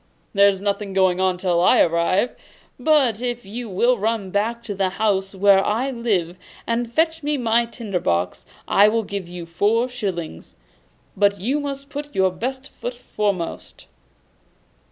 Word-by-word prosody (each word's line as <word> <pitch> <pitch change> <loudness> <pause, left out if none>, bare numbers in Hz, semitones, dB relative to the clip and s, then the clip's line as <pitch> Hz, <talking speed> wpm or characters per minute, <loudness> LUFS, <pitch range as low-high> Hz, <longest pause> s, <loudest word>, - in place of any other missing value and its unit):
'There's 200 -1 +4
nothing 200 0 -2
going 185 -1 +3
on 185 -1 +1
till 180 -2 +1
I 180 - +5
arrive. 170 +7 +2 0.4
But 255 -6 +3
if 245 -3 -3
you 230 +3 -6
will 240 +5 +2
run 215 -2 -1
back 230 +4 -1
to 215 - -4
the 190 -1 0
house 195 -1 -1
where 195 0 +5
I 240 +6 0
lived, 195 -8 -1 0.3
and 235 0 -1
fetch 320 +4 +1
me 295 0 -1
my 235 -1 +2
tinder 215 -6 -4
box, 90 - -1 0.2
I 205 +1 +5
will 225 +1 +1
give 200 -3 -5
you 175 -1 -7
four 210 +8 +1
shillings. 185 - -5 0.6
But 200 0 +2
you 255 +10 0
must 280 -1 -5
put 290 0 -6
your 190 -1 +3
best 260 +7 -5
foot 245 0 -6
foremost. 205 -7 -4
205 Hz, 155 wpm, -22 LUFS, 190-240 Hz, 0.6 s, I